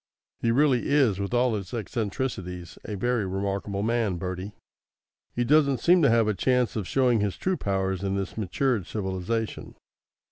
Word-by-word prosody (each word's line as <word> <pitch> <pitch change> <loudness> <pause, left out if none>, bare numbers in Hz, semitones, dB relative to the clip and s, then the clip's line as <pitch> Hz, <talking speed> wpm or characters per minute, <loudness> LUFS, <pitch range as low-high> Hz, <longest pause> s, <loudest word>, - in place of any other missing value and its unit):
He 115 - 0
really 130 +1 +3
is, 130 -9 +3
with 100 0 -3
all 125 0 +2
his 100 +1 -4
eccentricities, 100 -6 -4
a 105 - -4
very 120 +2 0
remarkable 100 +1 -2
man, 115 -4 +1
Bertie. 95 +3 -5 0.8
He 120 - +1
doesn't 140 +1 +4
seem 175 +7 +5
to 140 - +5
have 115 -1 +3
a 105 - +2
chance 125 +3 +1
of 105 -5 -3
showing 125 -4 +2
his 100 -2 -1
true 190 0 0
powers 95 - -1
in 100 -1 -1
this 95 -2 -3
matured 110 0 -1
civilisation. 100 +2 -3
110 Hz, 165 wpm, -26 LUFS, 95-125 Hz, 0.8 s, seem